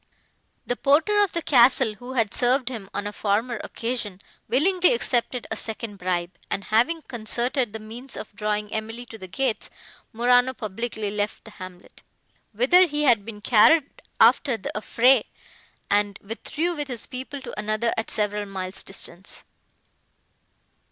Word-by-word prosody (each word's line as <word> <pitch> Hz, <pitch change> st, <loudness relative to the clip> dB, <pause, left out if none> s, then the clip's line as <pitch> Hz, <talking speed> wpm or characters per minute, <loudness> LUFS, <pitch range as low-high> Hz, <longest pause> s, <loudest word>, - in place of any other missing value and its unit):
The 245 Hz, -, -1 dB
porter 315 Hz, +11 st, +3 dB
of 405 Hz, -, +1 dB
the 335 Hz, -, -2 dB
castle, 250 Hz, -3 st, +5 dB
who 245 Hz, +5 st, -9 dB
had 225 Hz, -5 st, +1 dB
served 250 Hz, +1 st, +2 dB
him, 220 Hz, -6 st, -7 dB
on 205 Hz, -, -3 dB
a 205 Hz, -, -4 dB
former 215 Hz, +3 st, -1 dB
occasion, 230 Hz, -5 st, -4 dB, 0.3 s
willingly 360 Hz, -, +4 dB
accepted 245 Hz, -, -1 dB
a -, -, 0 dB
second 220 Hz, -1 st, -5 dB
bribe; 180 Hz, -1 st, -2 dB
and, 200 Hz, -, -2 dB
having 245 Hz, -, +1 dB
concerted 240 Hz, +1 st, -2 dB
the 220 Hz, -, -5 dB
means 230 Hz, +4 st, -9 dB
of 205 Hz, -, -8 dB
drawing 210 Hz, 0 st, -2 dB
Emily 225 Hz, +2 st, -4 dB
to 225 Hz, -2 st, -11 dB
the 190 Hz, -, -8 dB
gates, 255 Hz, +4 st, -2 dB, 0.4 s
Morano 245 Hz, +2 st, +3 dB
publicly 220 Hz, -1 st, -4 dB
left 205 Hz, 0 st, -3 dB
the 220 Hz, -, -11 dB
hamlet, 185 Hz, -2 st, -12 dB, 0.5 s
whither 270 Hz, -, +5 dB
he 295 Hz, -1 st, -1 dB
had 235 Hz, -7 st, +4 dB
been 210 Hz, -1 st, -9 dB
carried 270 Hz, +8 st, +4 dB, 0.2 s
after 265 Hz, -6 st, +5 dB
the -, -, -5 dB
affray, 245 Hz, +5 st, +4 dB, 0.6 s
and 205 Hz, 0 st, +1 dB
withdrew 310 Hz, -, -3 dB
with 295 Hz, -2 st, -3 dB
his 245 Hz, -5 st, -3 dB
people 265 Hz, +2 st, -6 dB
to -, -, -8 dB
another 215 Hz, +2 st, 0 dB
at 225 Hz, -, -3 dB
several 210 Hz, -1 st, -1 dB
miles 190 Hz, -1 st, -4 dB
distance. 190 Hz, -1 st, -7 dB
230 Hz, 150 wpm, -24 LUFS, 210-260 Hz, 0.6 s, castle